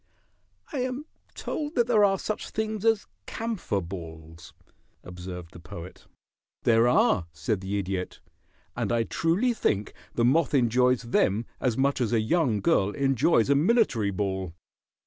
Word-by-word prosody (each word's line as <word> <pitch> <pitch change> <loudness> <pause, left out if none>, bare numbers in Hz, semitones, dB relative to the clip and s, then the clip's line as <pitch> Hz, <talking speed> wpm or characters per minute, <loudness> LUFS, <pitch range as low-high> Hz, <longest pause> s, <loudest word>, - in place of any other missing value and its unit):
"I 280 - -1
am 255 +3 -3 0.3
told 300 0 -4
that 240 - +3
there 225 -3 +4
are 195 -1 +4
such 215 +3 -4
things 215 -1 -3
as 225 -2 +3 0.2
camphor 220 - -2
balls," 85 -1 -9 0.5
observed 90 -1 -8
the - - -11
Poet. 90 0 -10 0.6
"There 115 0 +4
are," 90 -7 +3
said 75 +7 -2
the 100 +1 -2
Idiot. 95 -2 -3 0.6
"And - - -2
I 115 -1 +2
truly 180 - +1
think 105 - -1 0.2
the 115 - +2
moth 145 +3 +3
enjoys 125 0 +3
them 115 -2 +1
as 125 -3 0
much 135 0 +1
as 120 -1 0
a 115 - +4
young 115 - +1
girl 95 0 +3
enjoys 135 -1 +2
a - - +5
military 150 - +2
ball. 95 -3 -3
120 Hz, 145 wpm, -27 LUFS, -, 0.6 s, a